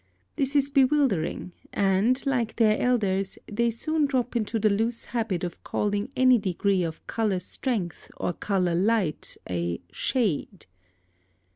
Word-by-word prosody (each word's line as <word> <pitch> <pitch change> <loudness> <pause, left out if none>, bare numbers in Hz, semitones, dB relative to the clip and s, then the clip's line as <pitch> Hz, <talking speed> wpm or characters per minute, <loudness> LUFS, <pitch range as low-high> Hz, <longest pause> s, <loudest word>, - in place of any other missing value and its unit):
This 275 -1 -1
is 280 0 +3
bewildering, 265 - +2 0.2
and, 205 +7 +2
like 245 -5 0
their 215 -2 +3
elders, 195 -6 +1
they 235 +3 0
soon 300 +6 0
drop 250 -3 -1
into 225 0 0
the 215 0 +2
loose 225 +3 -1
habit 225 -7 -2
of 175 -1 -5
calling 205 +4 -1
any 255 -2 +5
degree 195 0 +1
of 165 -2 -4
color 215 -5 0
strength 185 - -3
or 175 - -1
color 185 -3 0
light 190 -2 0
a 85 -1 -2
"shade." 200 - -1
215 Hz, 135 wpm, -26 LUFS, 190-250 Hz, 0.2 s, any